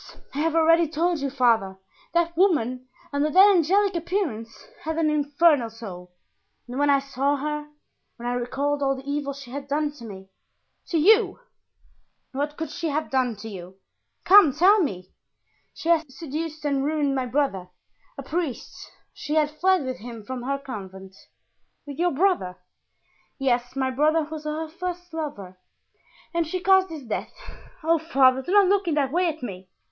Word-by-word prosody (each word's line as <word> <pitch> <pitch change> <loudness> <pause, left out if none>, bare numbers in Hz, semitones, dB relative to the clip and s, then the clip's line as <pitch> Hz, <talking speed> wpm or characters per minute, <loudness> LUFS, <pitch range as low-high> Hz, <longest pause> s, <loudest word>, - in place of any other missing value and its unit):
I 280 - -4
have 325 +1 0
already 330 +1 +4
told 330 +2 0
you, 280 0 -2
father, 230 -8 +2 0.4
that 340 0 +1
woman, 255 - +1 0.3
under 285 +2 +1
that 390 +5 +7
angelic 390 +4 +3
appearance, 320 - -3 0.2
had 320 0 -3
an 315 -2 +2
infernal 290 -3 +3
soul, 190 -6 -10 0.6
and 250 +3 -5
when 290 0 +3
I 280 - +6
saw 275 +1 -1
her, 300 +1 -4 0.5
when 240 0 -7
I 245 - 0
recalled 275 +4 -1
all 270 -1 +1
the 265 +1 -11
evil 285 0 -2
she 275 -3 -11
had 280 +1 -6
done 295 +1 0
to 285 -5 -12
me——" 190 -2 -10 0.6
"To 335 - 0
you? 395 +4 +4 0.9
What 290 +2 -3
could 320 -2 -4
she 330 - -3
have 305 +2 -2
done 255 -3 +1
to 225 - -7
you? 185 -3 -9 0.5
Come, 370 -7 +7
tell 380 +8 +5
me!" 185 - -3 0.6
"She 330 - -6
had 325 -4 +2
seduced 310 +2 -6
and 280 -2 +1
ruined 295 -1 0
my 260 -2 -1
brother, 240 -9 -1 0.5
a 275 - -6
priest. 310 -3 -3 0.4
She 300 - -4
had 305 -1 +2
fled 360 0 +2
with 255 -1 -4
him 230 -1 -9
from 255 +3 -6
her 275 +3 -2
convent." 190 -7 -9 0.7
"With 285 +1 -9
your 355 +1 +3
brother?" 285 - +1 0.8
"Yes, 245 -2 0
my 265 -1 0
brother 310 +4 +2
was 305 0 -8
her 310 +1 -3
first 355 +1 -6
lover, 205 - -6 0.7
and 335 -1 0
she 370 +3 -3
caused 380 0 +4
his 315 -4 -8
death. 230 - -5 0.5
Oh, 330 +1 +3
father, 265 -5 +3
do 350 - -6
not 405 0 +6
look 395 0 +2
in 320 - +1
that 275 -3 +1
way 355 +3 +2
at 315 -4 -4
me! 190 -5 -7
290 Hz, 175 wpm, -24 LUFS, 255-330 Hz, 0.9 s, that